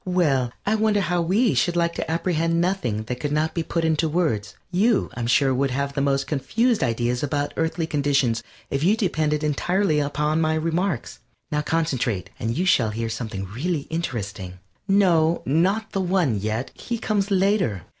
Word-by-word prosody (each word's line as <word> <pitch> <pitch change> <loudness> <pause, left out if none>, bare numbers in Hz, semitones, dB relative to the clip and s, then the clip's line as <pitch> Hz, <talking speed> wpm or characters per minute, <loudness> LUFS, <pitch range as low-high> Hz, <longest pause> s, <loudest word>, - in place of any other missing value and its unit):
Well, 145 -9 +2
I 210 - +2
wonder 215 -1 +2
how 175 -2 0
we 205 +8 +2
should 175 -5 +1
like 170 -1 +1
to - - -4
apprehend 165 0 0
nothing 175 - 0
that 125 +3 -5
could 145 +1 -2
not 155 +2 0
be 170 - -1
put 165 0 -1
into 160 0 +1
words? 145 - -1 0.2
You, 205 +4 +2
I'm 120 -1 -3
sure, 135 +2 +3
would 135 +2 +1
have 140 +2 -2
the 140 - -1
most 135 -1 +1
confused 220 - 0
ideas 120 0 0
about 145 0 -1
Earthly 160 0 -1
conditions 140 -6 +1 0.3
if 140 +1 -1
you 200 +6 +4
depended 155 -7 0
entirely 160 +2 +1
upon 150 +2 0
my 160 0 +2
remarks. 165 -1 -1 0.3
Now 150 -1 +1
concentrate, 135 - -1
and 115 +2 -2
you 180 - +1
shall 120 -11 +3
hear 115 +1 -3
something 110 -4 -4
really 145 - -2
interesting. 105 - -4 0.3
No, 170 -5 +3
not 190 +10 +1
the 195 - -1
One 180 - +1
yet. 110 +5 -3
He 235 - -4
comes 205 -2 -1
later. 190 - +1
155 Hz, 175 wpm, -23 LUFS, 130-180 Hz, 0.3 s, you